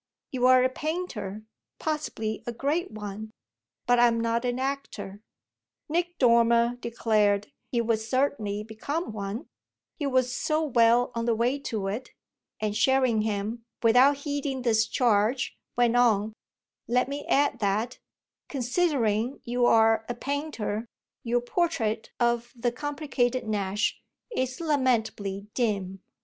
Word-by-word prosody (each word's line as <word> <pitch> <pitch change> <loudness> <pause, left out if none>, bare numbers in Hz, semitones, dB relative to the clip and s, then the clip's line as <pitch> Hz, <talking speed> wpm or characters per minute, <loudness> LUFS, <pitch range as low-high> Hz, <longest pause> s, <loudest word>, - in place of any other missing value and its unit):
You're 255 0 +5
a 255 - +3
painter, 255 - -4 0.3
possibly 295 -8 -3
a - - -1
great 285 +9 -1
one; 215 0 -7 0.6
but 245 -1 +4
I'm 235 -1 +4
not 230 +1 0
an 245 0 0
actor." 265 -7 -4 0.7
Nick 345 +2 -1
Dormer 235 -1 +4
declared 215 -4 +1 0.2
he 240 - +2
would 230 -1 +1
certainly 220 -3 -1
become 250 +9 -4
one 210 +6 -5 0.5
he 290 - -1
was 255 -2 +1
so 310 0 0
well 240 -3 +4
on 230 0 -2
the 235 -1 +2
way 245 +5 +1
to 220 -7 -3
it; 215 +7 -4 0.5
and 210 -1 -1
Sherringham, 225 -3 +1 0.2
without 250 +5 +6
heeding 280 -2 -3
this 220 -2 +3
charge, 235 +1 +1 0.2
went 240 -1 +3
on: 220 -3 +3 0.5
"Let 250 +2 +2
me 285 +1 -4
add 280 -3 +2
that, 215 +4 -1 0.5
considering 250 - 0
you 245 0 +1
are 225 -1 +4
a 240 - -2
painter, 240 -5 -3 0.4
your 240 +1 +1
portrait 245 -6 -1
of 240 0 +1
the 240 0 0
complicated 260 -3 -1
Nash 205 -1 -1 0.3
is 255 0 -1
lamentably 230 - 0
dim." 195 -6 -1
240 Hz, 125 wpm, -27 LUFS, 220-265 Hz, 0.7 s, without